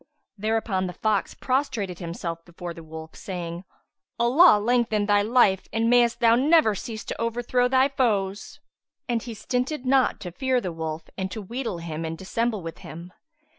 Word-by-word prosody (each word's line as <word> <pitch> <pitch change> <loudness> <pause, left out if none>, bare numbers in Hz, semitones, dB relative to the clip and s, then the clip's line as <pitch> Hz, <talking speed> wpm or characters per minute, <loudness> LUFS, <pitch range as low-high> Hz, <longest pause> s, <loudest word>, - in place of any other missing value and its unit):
Thereupon 215 -3 -1
the 180 - -6
fox 215 -1 -1
prostrated 255 - -1
himself 170 -1 -5
before 175 0 -8
the 165 - -10
wolf, 160 0 -10
saying, 180 -4 -6 0.5
"Allah 255 +4 +6
lengthen 225 -2 +1
thy 205 0 +4
life 205 -4 +3
and 230 +1 +1
mayst 240 -1 +3
thou 230 -1 +6
never 285 -2 +4
cease 220 +2 -6
to - - -5
overthrow 240 +2 +1
thy 260 +1 +4
foes!" 205 -7 -1 0.5
And 235 -2 0
he 235 -1 -7
stinted 250 +5 -2
not 265 0 +3
to 180 -3 -6
fear 260 +6 0
the 185 -7 -4
wolf 160 0 -4 0.2
and 190 0 -2
to 205 - -6
wheedle 235 -1 -4
him 165 -1 -5
and 165 0 -4
dissemble 215 +2 -2
with 165 0 -7
him. 170 +3 -10
215 Hz, 170 wpm, -25 LUFS, 180-245 Hz, 0.5 s, Allah